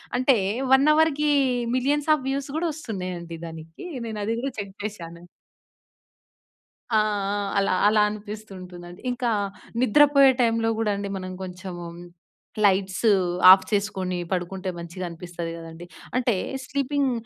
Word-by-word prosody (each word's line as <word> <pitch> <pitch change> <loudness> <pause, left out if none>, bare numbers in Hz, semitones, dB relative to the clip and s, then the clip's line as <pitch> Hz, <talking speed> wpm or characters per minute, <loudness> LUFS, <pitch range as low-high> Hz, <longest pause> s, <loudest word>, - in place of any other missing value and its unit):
అంటే 255 0 +4 0.4
1 275 +3 +5
అవర్‍కి 300 -1 +2 0.5
millions 285 +3 0
of 295 -4 -1
views 275 0 -2
కూడా 340 +1 0
వస్తున్నాయండి 180 - -6
దానికి. 160 - -10 0.2
నేను 220 -1 -5
అది 225 - -1
కూడా 270 +3 -3
చెక్ 200 -1 -6
చేశాను. 170 -5 -7 1.7
ఆ! 220 - +4 0.4
ఆ! - - -1 0.2
అలా 195 -1 +2
అలా 215 0 +4
అనిపిస్తుంటుందండి. 190 -4 -9
ఇంకా 245 -1 -1 0.5
నిద్రపోయే 275 +2 +6
టైంలో 230 -1 +2
కూడా 215 -2 +1
అండి 200 0 -4
మనం 185 0 -6
కొంచెం 185 0 -7 0.9
లైట్స్ 190 +1 +1 0.5
ఆఫ్ 190 0 +7
చేసుకొని 195 -3 -1
పడుకుంటే, 185 +1 -2
మంచిగా 175 +2 -6
అనిపిస్తది 170 0 -6
కదండీ! 165 +1 -10 0.3
అంటే 245 -4 +2 0.3
స్లీపింగ్ 280 0 0
205 Hz, 120 wpm, -24 LUFS, 180-255 Hz, 1.7 s, ఆఫ్